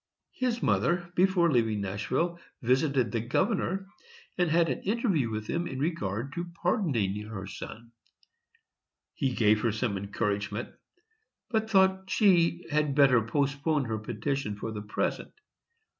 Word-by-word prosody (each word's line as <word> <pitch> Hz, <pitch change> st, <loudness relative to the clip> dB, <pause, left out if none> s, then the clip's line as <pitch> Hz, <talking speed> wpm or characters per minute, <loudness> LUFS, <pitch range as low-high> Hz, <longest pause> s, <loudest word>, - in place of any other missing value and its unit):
His 245 Hz, -2 st, -1 dB
mother, 175 Hz, 0 st, +1 dB
before 180 Hz, -2 st, +3 dB
leaving 115 Hz, -5 st, +2 dB
Nashville, 130 Hz, -, -1 dB, 0.2 s
visited 130 Hz, -1 st, +2 dB
the 115 Hz, -, 0 dB
governor, 190 Hz, -, 0 dB, 0.5 s
and 180 Hz, -2 st, +1 dB
had 165 Hz, +1 st, +3 dB
an 130 Hz, -, -2 dB
interview 195 Hz, -, +1 dB
with 110 Hz, -1 st, -4 dB
him 170 Hz, +8 st, -2 dB
in 130 Hz, -, -5 dB
regard 135 Hz, -, -2 dB
to 175 Hz, 0 st, -5 dB
pardoning 115 Hz, -, +1 dB
her 100 Hz, -3 st, -6 dB
son. 115 Hz, +4 st, -9 dB, 1.2 s
He 135 Hz, -4 st, -1 dB
gave 110 Hz, -1 st, +3 dB
her 115 Hz, -, +1 dB
some 110 Hz, -2 st, -1 dB
encouragement, 100 Hz, +2 st, -2 dB, 0.8 s
but 220 Hz, -1 st, 0 dB
thought 190 Hz, -2 st, +3 dB
she 180 Hz, -4 st, +3 dB
had 150 Hz, -2 st, +1 dB
better 135 Hz, -5 st, +6 dB
postpone 140 Hz, +5 st, 0 dB
her 110 Hz, -2 st, -2 dB
petition 110 Hz, +1 st, -3 dB
for 110 Hz, +2 st, -5 dB
the 105 Hz, -1 st, -5 dB
present. 105 Hz, 0 st, -3 dB
140 Hz, 135 wpm, -29 LUFS, 110-175 Hz, 1.2 s, better